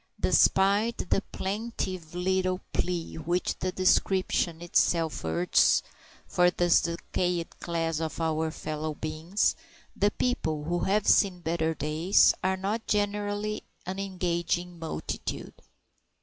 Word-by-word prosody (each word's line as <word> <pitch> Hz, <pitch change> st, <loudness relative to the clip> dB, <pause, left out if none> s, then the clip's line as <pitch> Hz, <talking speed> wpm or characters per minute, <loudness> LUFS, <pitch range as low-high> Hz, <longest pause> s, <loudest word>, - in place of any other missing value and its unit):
Despite 200 Hz, +2 st, +3 dB
the -, -, +3 dB
plaintive 190 Hz, -5 st, -4 dB
little 185 Hz, 0 st, 0 dB
plea 175 Hz, -3 st, -2 dB
which 175 Hz, +3 st, -1 dB
the 185 Hz, -, -1 dB
description 185 Hz, -2 st, +1 dB
itself 170 Hz, -1 st, +1 dB
urges 80 Hz, +2 st, +3 dB, 0.4 s
for 180 Hz, 0 st, +3 dB
this 175 Hz, -1 st, +3 dB
decayed 170 Hz, 0 st, -2 dB
class 165 Hz, -2 st, -2 dB
of 160 Hz, 0 st, -4 dB
our 160 Hz, -1 st, 0 dB
fellow 155 Hz, -1 st, -4 dB
beings, 160 Hz, +7 st, 0 dB, 0.4 s
the 205 Hz, -, +3 dB
people 160 Hz, -11 st, -1 dB
who 175 Hz, +3 st, -1 dB
"have 200 Hz, +4 st, +1 dB
seen 185 Hz, -3 st, +4 dB
better 160 Hz, -1 st, -1 dB
days" 155 Hz, +6 st, +4 dB
are 190 Hz, 0 st, +1 dB
not 205 Hz, +4 st, -3 dB
generally 205 Hz, 0 st, -1 dB, 0.2 s
an 190 Hz, +2 st, -4 dB
engaging 175 Hz, -2 st, -2 dB
multitude. 165 Hz, -1 st, -5 dB
175 Hz, 115 wpm, -28 LUFS, 165-190 Hz, 0.4 s, seen